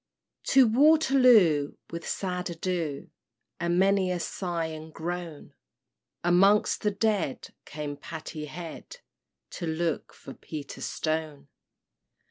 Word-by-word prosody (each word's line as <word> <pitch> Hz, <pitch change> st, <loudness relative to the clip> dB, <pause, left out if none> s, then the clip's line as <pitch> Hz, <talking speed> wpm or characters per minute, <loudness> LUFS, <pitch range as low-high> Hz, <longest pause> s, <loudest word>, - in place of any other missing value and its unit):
To 270 Hz, -1 st, +6 dB
Waterloo, 250 Hz, -, +5 dB, 0.2 s
with 170 Hz, 0 st, -6 dB
sad 180 Hz, -1 st, -3 dB
ado, 165 Hz, -4 st, -3 dB, 0.5 s
And 170 Hz, 0 st, 0 dB
many 195 Hz, 0 st, +3 dB
a 180 Hz, -1 st, -1 dB
sigh 170 Hz, -1 st, -3 dB
and 160 Hz, 0 st, -7 dB
groan, 170 Hz, -1 st, -6 dB, 0.7 s
Amongst 195 Hz, +4 st, +4 dB
the 210 Hz, -, +2 dB
dead, 200 Hz, -7 st, -1 dB, 0.2 s
came 150 Hz, -1 st, -6 dB
Patty 155 Hz, +1 st, -7 dB
Head, 165 Hz, -, -9 dB, 0.5 s
To 170 Hz, -, -5 dB
look 160 Hz, -1 st, -2 dB
for 135 Hz, -, -11 dB
Peter 150 Hz, -3 st, -8 dB
Stone. 155 Hz, -3 st, -3 dB
170 Hz, 105 wpm, -27 LUFS, 155-195 Hz, 0.7 s, To